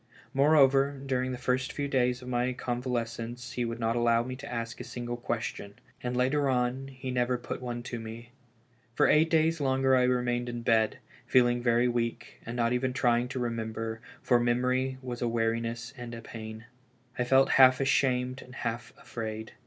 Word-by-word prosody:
Moreover, 140 -1 +4
during 130 -1 0
the 125 - -4
first 125 +1 -1
few 145 -1 -3
days 125 -2 +1
of - - -10
my 125 0 0
convalescence 120 -1 -3
he 125 - -2
would 115 0 -4
not 115 0 0
allow 120 -1 +3
me 130 +1 -5
to - - -9
ask 115 -1 -4
a - - -5
single 120 0 -5
question; 115 -4 -4 0.3
and 125 0 -2
later 135 +3 +2
on, 125 +1 0
he 130 -1 -6
never 125 0 +1
put 120 - -6
one 120 -1 -4
to 120 -1 -5
me. 115 +2 -9 0.6
For - - +4
eight 160 +2 +4
days 160 0 +2
longer 130 -1 +3
I 130 - +4
remained 125 -1 0
in 120 -1 -5
bed, 110 -2 +2 0.3
feeling 120 -1 +4
very 120 0 +3
weak, 120 -1 -3
and 115 - -4
not 120 0 +2
even 125 +1 0
trying 120 -1 +2
to 130 +1 -4
remember, 115 -1 -3 0.2
for 120 -2 +4
memory 125 +2 +1
was 125 -1 -5
a 120 - +1
weariness 115 +1 -1
and 120 -2 -7
a 115 - -8
pain. 110 0 -8 0.5
I - - +3
felt 135 +2 +4
half 130 -1 +7
ashamed 130 -1 +1
and 125 - -13
half 115 -1 -4
afraid. 110 -1 -6
125 Hz, 185 wpm, -29 LUFS, 115-130 Hz, 0.6 s, half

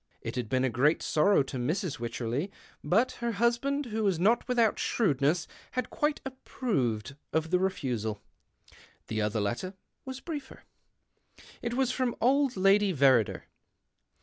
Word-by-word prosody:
It - - -4
had 120 -4 -3
been 130 +2 +1
a 130 - +2
great 140 +7 +2
sorrow 155 +1 +3
to 135 0 -6
Mrs. 150 - -2
Wycherley, 120 - -2 0.3
but 225 +8 +3
her 235 -1 -1
husband, 240 +6 +1
who 220 -2 -2
was 190 -5 +1
not 220 +8 +3
without 235 -4 +2
shrewdness, 160 - +1 0.3
had 255 -2 -2
quite 295 0 0
approved 140 - -2 0.2
of 160 +1 -1
the 180 - +4
refusal. 125 - -2 0.9
The 110 0 -1
other 105 +1 0
letter 120 - -2 0.3
was 260 0 -6
briefer. 290 -4 -7 1.0
It 235 0 -2
was 260 -1 +2
from 255 -2 -1
old 270 -1 +2
Lady 195 +1 +4
Verrider. 130 - +3
185 Hz, 145 wpm, -29 LUFS, -, 1.0 s, the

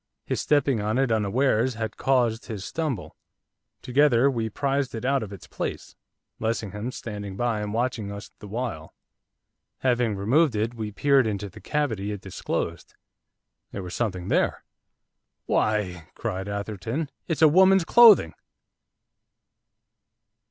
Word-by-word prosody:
His - - -1
stepping 140 -6 +2
on 105 +3 0
it 135 -3 +2
unawares 115 +3 +1
had 110 -1 -4
caused 120 -4 +1
his 105 -5 -5
stumble. 150 - -3 0.7
Together 135 0 +4
we 115 -3 -2
prised 140 +2 -1
it 115 - -5
out 135 0 +2
of 105 -2 -6
its 100 -4 -10
place, - - -5 0.4
Lessingham 110 0 -3
standing 105 -5 -7
by 115 -2 0
and 105 0 -3
watching 115 -2 -2
us 100 +1 -8
the 105 - -10
while. 110 -7 -5 0.9
Having 120 -4 +1
removed 125 +8 +2
it, 110 +3 -1
we 110 -3 -5
peered 135 +2 +3
into 100 -1 -3
the - - -14
cavity 115 -10 -1
it 105 - -5
disclosed. 85 -3 -4 0.8
There 100 - -5
was 90 0 -7
something 95 -6 -2
there. - - +1 0.8
'Why,' 90 -6 0
cried 95 -4 -4
Atherton, 105 - -4 0.2
'it's 165 -1 0
a - - +10
woman's 190 +3 +5
clothing! 220 - +7
115 Hz, 135 wpm, -25 LUFS, 100-135 Hz, 0.9 s, a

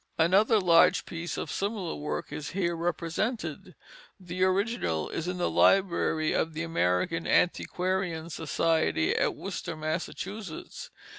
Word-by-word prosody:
Another 195 +7 +4
large 170 -3 +5
piece 170 0 -5
of - - -4
similar 200 -4 -2
work 150 - -4
is 150 -1 -5
here 170 -3 +1
represented. 175 +7 -3 0.4
The 185 0 -3
original 185 - 0
is 165 - -4
in 180 0 -2
the 175 - 0
library 170 -4 +3
of 160 0 -1
the 155 - -2
American 165 - 0
Antiquarian 180 -2 0
Society 160 - +1
at - - +1
Worcester, 160 - -5
Massachusetts. 170 +4 -5
170 Hz, 125 wpm, -28 LUFS, 160-190 Hz, 0.4 s, large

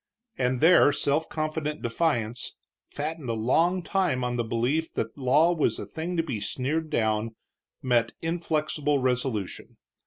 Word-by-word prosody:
And 125 -1 0
there 165 -2 +7
self 145 +2 0
confident 155 -1 -3
defiance, 120 -3 -1 0.3
fattened 150 -2 -5
a - - +1
long 165 +11 +2
time 180 -10 0
on 125 0 -1
the 120 - 0
belief 120 +8 0
that 115 0 -3
law 145 +6 +3
was 160 - +1
a - - -5
thing 170 +2 -4
to 165 - +2
be 130 -9 -3
sneered 140 +9 -2
down, 110 -1 0 0.5
met 120 -3 +2
inflexible 155 -3 0
resolution. 125 -6 -2
145 Hz, 145 wpm, -27 LUFS, 120-160 Hz, 0.5 s, there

